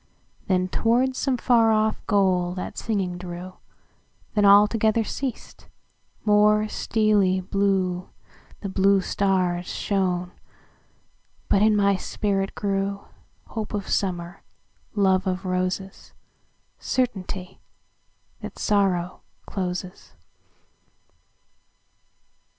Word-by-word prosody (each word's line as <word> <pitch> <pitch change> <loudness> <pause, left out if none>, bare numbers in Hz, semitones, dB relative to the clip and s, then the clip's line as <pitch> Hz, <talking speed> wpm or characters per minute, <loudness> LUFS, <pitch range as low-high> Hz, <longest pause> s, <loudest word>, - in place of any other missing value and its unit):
Then 185 -1 +1
toward 245 +6 +1
some 265 -1 0
far 230 -2 +4
off 215 0 +1
goal 185 -4 +2
that 185 - -5
singing 190 -5 -2
drew; 180 +1 -8 0.8
Then 210 -1 +3
altogether 210 +2 +5
ceas'd; 255 +2 -6 0.6
more 210 0 +4
steely 210 -4 +1
blueThe 190 -2 0 0.6
blue 195 0 +4
stars 185 -2 0
shone; 180 -3 -1 1.2
but 200 - +3
in 215 0 +4
my 200 -1 +3
spirit 195 0 -2
grewHope 200 +2 -5
of 200 -1 -4
Summer, 175 -1 -2 0.5
love 190 -1 +2
of 185 +1 -2
Roses, 185 +1 -3 0.7
Certainty 195 -7 -3 0.8
that - - -8
Sorrow 190 -4 0 0.2
closes. 185 -1 -5
195 Hz, 85 wpm, -24 LUFS, 185-210 Hz, 1.2 s, altogether